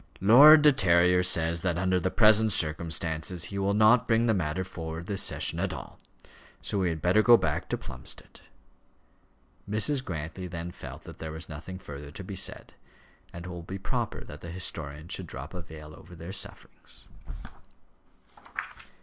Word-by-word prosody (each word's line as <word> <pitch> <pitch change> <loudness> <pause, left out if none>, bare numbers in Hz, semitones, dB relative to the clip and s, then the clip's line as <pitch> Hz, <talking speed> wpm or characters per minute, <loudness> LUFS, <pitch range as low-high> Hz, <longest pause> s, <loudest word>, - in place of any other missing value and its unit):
"Lord 145 +10 +8
De 150 - +8
Terrier 90 -7 +4
says 85 -2 +1
that 85 -2 -1
under 95 +1 +1
the 95 - -1
present 110 +1 +5
circumstances 80 0 0
he 100 +2 -4
will 100 +1 +1
not 110 +3 +5
bring 115 +1 +3
the 115 - +3
matter 90 -1 -1
forward 80 -2 -7
this 100 0 -3
session - - 0
at - - -2
all. - - -10 0.6
So 100 - 0
we 90 -2 +1
had 80 -2 -5
better 90 +5 +4
go 120 +2 +7
back - - -2
to - - -1
Plumstead." - - -8 1.3
Mrs. 130 +6 +2
Grantly 85 - -6
then 85 0 -6
felt - - -10
that - - -12
there 80 -1 -6
was 80 +1 -6
nothing 80 +5 -8
further 75 -5 -9
to 95 - -8
be 95 +1 -7
said, - - -3 0.6
and 85 +1 -9
it - - -7
will 90 -1 -7
be 95 +3 -7
proper 95 - -3
that 75 +1 -11
the 85 - -8
historian 80 -3 -4
should - - -5
drop - - -8
a 90 - -6
veil 75 -2 -11
over 90 - -14
their 85 +3 -8
sufferings. - - -8
90 Hz, 175 wpm, -28 LUFS, 80-100 Hz, 1.3 s, Lord